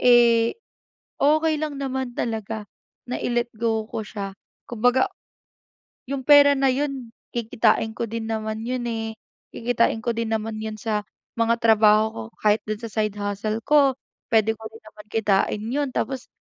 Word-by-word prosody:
eh, 235 Hz, -, +5 dB, 0.6 s
okey 310 Hz, +2 st, +3 dB
lang 305 Hz, -1 st, -3 dB
naman 265 Hz, -2 st, -3 dB
talaga 220 Hz, -1 st, -3 dB, 0.5 s
na -, -, -2 dB
i-let 240 Hz, -1 st, -1 dB
go 225 Hz, -1 st, +1 dB
ko 220 Hz, -, -4 dB
siya 200 Hz, -2 st, -5 dB, 0.4 s
kumbaga, 245 Hz, +2 st, +2 dB, 1.0 s
yung 270 Hz, -2 st, -3 dB
pera 285 Hz, -1 st, +7 dB
na 270 Hz, 0 st, +3 dB
'yun 270 Hz, -4 st, -3 dB, 0.2 s
kikitain 220 Hz, -1 st, +1 dB
ko -, -, -3 dB
din 225 Hz, 0 st, -4 dB
naman 220 Hz, -1 st, -3 dB
'yun, 250 Hz, 0 st, -2 dB
eh, 225 Hz, -1 st, -3 dB, 0.4 s
kikitain 230 Hz, -1 st, +1 dB
ko 240 Hz, -, +1 dB
din 230 Hz, 0 st, -2 dB
naman 220 Hz, 0 st, -3 dB
'yun 220 Hz, 0 st, -4 dB
sa 210 Hz, 0 st, -2 dB, 0.3 s
mga 230 Hz, 0 st, +3 dB
trabaho 215 Hz, -1 st, +5 dB
ko 115 Hz, -, -6 dB, 0.2 s
kahit 210 Hz, 0 st, +4 dB
do'n 215 Hz, +1 st, -3 dB
sa 230 Hz, -, -4 dB
side 215 Hz, -1 st, 0 dB
hustle 205 Hz, +2 st, -2 dB
ko 285 Hz, -1 st, +4 dB, 0.3 s
puwede 220 Hz, -1 st, +3 dB
ko 220 Hz, -, -14 dB
din 225 Hz, +1 st, -15 dB
naman 215 Hz, -1 st, -14 dB
kitain 210 Hz, -1 st, +1 dB
'yun 285 Hz, +1 st, 0 dB
tapos 260 Hz, +2 st, -2 dB
230 Hz, 155 wpm, -24 LUFS, 215-250 Hz, 1.0 s, pera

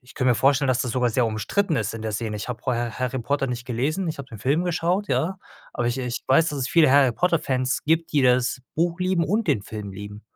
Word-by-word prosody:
ich 125 Hz, 0 st, -18 dB
könnte 130 Hz, -3 st, +2 dB
mir -, -, +4 dB
vorstellen, 135 Hz, +2 st, +2 dB
dass 125 Hz, -1 st, +2 dB
das 125 Hz, -, -3 dB
sogar 125 Hz, -2 st, +1 dB
sehr 120 Hz, +1 st, +2 dB
umstritten 155 Hz, -, -1 dB
ist 110 Hz, -1 st, -2 dB
in 115 Hz, -, -6 dB
der 110 Hz, -1 st, -3 dB
Szene. 105 Hz, 0 st, -3 dB
Ich 105 Hz, -, -6 dB
habe 120 Hz, -2 st, -5 dB
vorher 120 Hz, -2 st, -2 dB
Harry 130 Hz, +1 st, -1 dB
Potter 135 Hz, +3 st, -1 dB
nicht 125 Hz, 0 st, -5 dB
gelesen, 145 Hz, +10 st, -1 dB
ich 160 Hz, -2 st, -4 dB
habe 135 Hz, -, -8 dB
den 115 Hz, -5 st, -10 dB
Film 140 Hz, -, +1 dB
geschaut, 180 Hz, +3 st, 0 dB
ja? 190 Hz, +4 st, 0 dB, 0.3 s
Aber 120 Hz, -, -2 dB
ich 120 Hz, +2 st, -1 dB
ich 125 Hz, -2 st, -3 dB
weiß, 160 Hz, +5 st, +4 dB
dass 145 Hz, -, -4 dB
es 125 Hz, -2 st, -2 dB
viele 155 Hz, -1 st, +5 dB
Harry 135 Hz, -3 st, +5 dB
Potter-Fans 135 Hz, -5 st, 0 dB
gibt, 160 Hz, +2 st, +1 dB
die 145 Hz, -3 st, +3 dB
das 125 Hz, +1 st, +2 dB
Buch 170 Hz, +2 st, 0 dB
lieben 185 Hz, -2 st, +1 dB
und 210 Hz, +3 st, 0 dB
den 110 Hz, -9 st, +2 dB
Film 105 Hz, -2 st, -7 dB
lieben. 105 Hz, +1 st, -9 dB
130 Hz, 255 wpm, -24 LUFS, 120-160 Hz, 0.3 s, viele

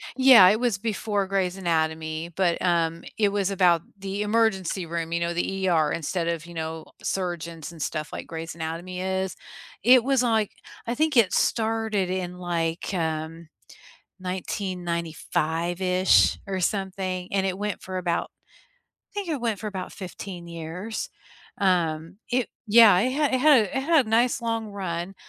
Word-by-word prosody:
Yeah, 260 Hz, -8 st, +8 dB
it 215 Hz, +3 st, +2 dB
was 240 Hz, -5 st, +1 dB
before 205 Hz, -2 st, -1 dB
Grey's 190 Hz, -1 st, -1 dB
Anatomy 160 Hz, -1 st, -1 dB
but, 180 Hz, -3 st, +1 dB
um, 170 Hz, -1 st, +1 dB
it 210 Hz, -2 st, +3 dB
was 200 Hz, -1 st, 0 dB
about 175 Hz, -4 st, +4 dB, 0.2 s
the 195 Hz, +1 st, -4 dB
emergency 210 Hz, -4 st, +1 dB
room, 165 Hz, 0 st, -4 dB
you 170 Hz, -, 0 dB
know, 170 Hz, 0 st, -1 dB
the 190 Hz, +2 st, -1 dB
ER 155 Hz, -3 st, +3 dB
instead 170 Hz, +1 st, -2 dB
of, 170 Hz, -1 st, -2 dB
you 170 Hz, -, -11 dB
know, 160 Hz, 0 st, -5 dB, 0.2 s
surgeons 170 Hz, -3 st, -3 dB
and 165 Hz, -3 st, -11 dB
stuff 155 Hz, +1 st, -3 dB
like -, -, -6 dB
Grey's 165 Hz, 0 st, -6 dB
Anatomy 170 Hz, +3 st, -5 dB
is, 190 Hz, 0 st, -2 dB, 0.5 s
it 245 Hz, 0 st, +7 dB
was 265 Hz, -2 st, +2 dB
like, 220 Hz, -3 st, +1 dB, 0.4 s
I 235 Hz, -, -1 dB
think 305 Hz, -3 st, +1 dB
it 215 Hz, -5 st, +5 dB
started 220 Hz, -4 st, +1 dB
in 180 Hz, -1 st, -3 dB
like 170 Hz, 0 st, -2 dB
um 160 Hz, -1 st, -3 dB, 0.8 s
1995-ish 175 Hz, -1 st, 0 dB
or 190 Hz, -1 st, -3 dB
something 185 Hz, -1 st, -2 dB
and 195 Hz, -1 st, +1 dB
it 190 Hz, 0 st, -1 dB
went 210 Hz, -1 st, -3 dB
for 185 Hz, -1 st, -5 dB
about, 175 Hz, -2 st, -1 dB, 0.8 s
I -, -, -33 dB
think 405 Hz, -3 st, -4 dB
it 300 Hz, -6 st, -2 dB
went 225 Hz, -4 st, -1 dB
for 215 Hz, -, -6 dB
about 190 Hz, -3 st, -5 dB
15 180 Hz, -2 st, -8 dB
years, 170 Hz, +6 st, -5 dB, 0.5 s
um, 170 Hz, -2 st, 0 dB
it, 250 Hz, -1 st, +1 dB, 0.2 s
yeah, 215 Hz, -3 st, +7 dB
it 250 Hz, +5 st, +1 dB
had 290 Hz, -2 st, +1 dB
it 255 Hz, -, +1 dB
had 290 Hz, -4 st, +7 dB
it 275 Hz, -, -7 dB
had 315 Hz, -4 st, +3 dB
a -, -, -7 dB
nice 235 Hz, +2 st, +2 dB
long 225 Hz, -2 st, -2 dB
run, 185 Hz, -2 st, -4 dB
185 Hz, 160 wpm, -25 LUFS, 170-210 Hz, 0.8 s, Yeah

